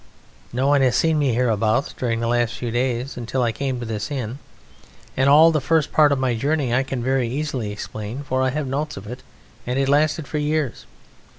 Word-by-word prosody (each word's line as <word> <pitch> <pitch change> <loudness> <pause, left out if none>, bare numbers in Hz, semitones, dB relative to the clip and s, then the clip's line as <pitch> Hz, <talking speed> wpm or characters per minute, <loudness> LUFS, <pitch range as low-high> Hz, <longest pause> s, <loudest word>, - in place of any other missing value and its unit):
No 130 +3 -1
one 140 0 +4
has 125 -2 +3
seen 160 +1 +2
me 135 -5 +1
hereabouts 115 0 +1
during 115 -2 -2
the 115 - -1
last 120 0 +1
few 120 -2 -4
days 125 +2 -1
until 125 +2 -2
I 115 - +1
came 130 +1 -3
to 120 - -5
this 110 +1 -4
inn. 130 -2 -4 0.8
And 135 +1 +3
all 155 +3 +7
the 155 -2 0
first 160 +2 +1
part 150 -2 +5
of 140 - +2
my 130 -2 0
journey 140 0 0
I 130 - +3
can 135 -2 -4
very 130 -2 +1
easily 130 -5 -3
explain, 110 +5 -6
for 130 -1 -1
I 130 - +2
have 150 +3 -2
notes 145 +3 -3
of 95 - -8
it, 125 +4 -8 0.5
and 125 +1 -1
it 135 0 +1
lasted 145 +1 +2
for 150 - -2
years. 150 -3 -2
130 Hz, 215 wpm, -22 LUFS, 120-145 Hz, 0.8 s, all